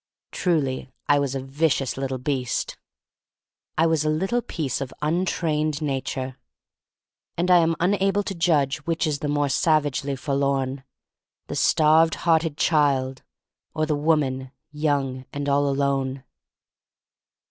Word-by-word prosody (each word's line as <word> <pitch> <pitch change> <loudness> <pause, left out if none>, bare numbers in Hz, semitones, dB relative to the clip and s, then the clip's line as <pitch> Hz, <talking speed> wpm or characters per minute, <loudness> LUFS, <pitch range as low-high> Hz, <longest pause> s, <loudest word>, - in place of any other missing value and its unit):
Truly 140 -7 -1 0.2
I 145 0 +4
was 140 -1 -1
a - - -1
vicious 135 -1 0
little 135 -1 -3
beast. 130 -1 -2 1.0
I 160 - +4
was 160 -2 +2
a 155 - +1
little 190 +10 0
piece 145 - -3
of 135 - -4
untrained 155 -2 0
Na 140 -4 -1
ture. 130 -1 -5 1.0
And 175 +2 +1
I 180 - +8
am 165 0 +2
unable 195 +2 +2
to 195 - -4
judge 155 -6 +2
which 165 +3 -1
is 150 -2 -1
the 145 - -3
more 145 0 +1
savagely 145 -1 +1
forlorn: 140 -1 -1 0.6
the - - -6
starved 160 +1 +4
hearted 160 -3 +2
child, 135 -5 +2 0.5
or 155 0 +1
the 155 - 0
woman, 145 -4 0 0.2
young 140 -4 -1
and 145 0 -3
all 140 0 +2
alone. 135 -1 -1
145 Hz, 135 wpm, -24 LUFS, 135-160 Hz, 1.0 s, I